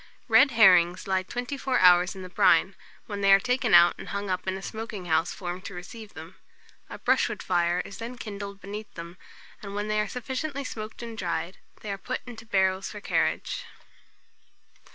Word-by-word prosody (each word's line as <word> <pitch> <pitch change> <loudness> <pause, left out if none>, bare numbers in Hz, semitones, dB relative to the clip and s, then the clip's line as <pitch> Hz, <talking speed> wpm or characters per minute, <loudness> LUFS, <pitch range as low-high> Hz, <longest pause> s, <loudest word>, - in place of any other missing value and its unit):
Red 290 - +6
herrings 180 -7 +5
lie 190 -1 +1
twenty 245 +8 -5
four 260 -1 0
hours 180 +1 +5
in 190 - -8
the 185 - -8
brine, - - +3 0.3
when 205 -3 -5
they 195 0 +4
are 195 - +8
taken 250 -2 +2
out 175 0 +7
and - - -8
hung 200 -1 -3
up 185 +1 -3
in 190 0 -1
a - - -9
smoking 220 -4 -6
house 160 -1 +1
formed 180 -1 -6
to 200 - -7
receive 215 +4 -10
them. 165 +4 -11 0.5
A - - -7
brushwood - - +1
fire 175 0 +1
is 200 - -10
then 240 +2 -6
kindled 200 -3 -7
beneath 205 +2 -8
them, 170 +1 -9 0.4
and 200 -1 -7
when 205 +1 -3
they 215 0 +1
are 210 - 0
sufficiently 270 +3 -4
smoked 220 -2 -7
and 230 -1 -7
dried, 170 -2 -3 0.2
they 210 - -5
are 195 - -4
put 255 +5 -4
into 230 -2 -10
barrels 190 -2 +1
for 210 - -8
carriage. - - -1
200 Hz, 195 wpm, -27 LUFS, 180-225 Hz, 0.5 s, are